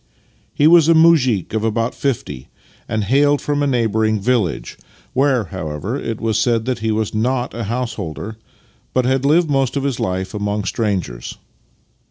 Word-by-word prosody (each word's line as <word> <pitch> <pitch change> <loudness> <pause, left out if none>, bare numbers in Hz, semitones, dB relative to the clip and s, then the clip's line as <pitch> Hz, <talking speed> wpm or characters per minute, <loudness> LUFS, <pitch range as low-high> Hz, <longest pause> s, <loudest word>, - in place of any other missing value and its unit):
He 145 - +1
was 165 0 +6
a 165 - +6
muzhik 140 - +3
of 110 -1 -1
about 115 +1 0
fifty, 90 - -3 0.4
and 110 -1 -1
hailed 145 +6 +3
from 145 0 -1
a 145 - +1
neighbouring 110 -4 +1
village 105 - -1 0.2
— - - -31
where, 135 -3 +2
however, 80 - -5
it 115 -5 -4
was 110 -1 0
said 115 -1 +1
that 125 -2 -2
he 110 0 -1
was 110 -1 -1
not 125 +3 -1
a 115 -1 -4
householder, 110 - -4 0.6
but 130 -1 +2
had 130 +1 +1
lived 160 +2 +3
most 135 -1 +1
of 140 - -1
his 140 -4 -2
life 95 +2 -2
among 105 0 -2
strangers. 95 - -3
115 Hz, 170 wpm, -19 LUFS, 105-135 Hz, 0.6 s, was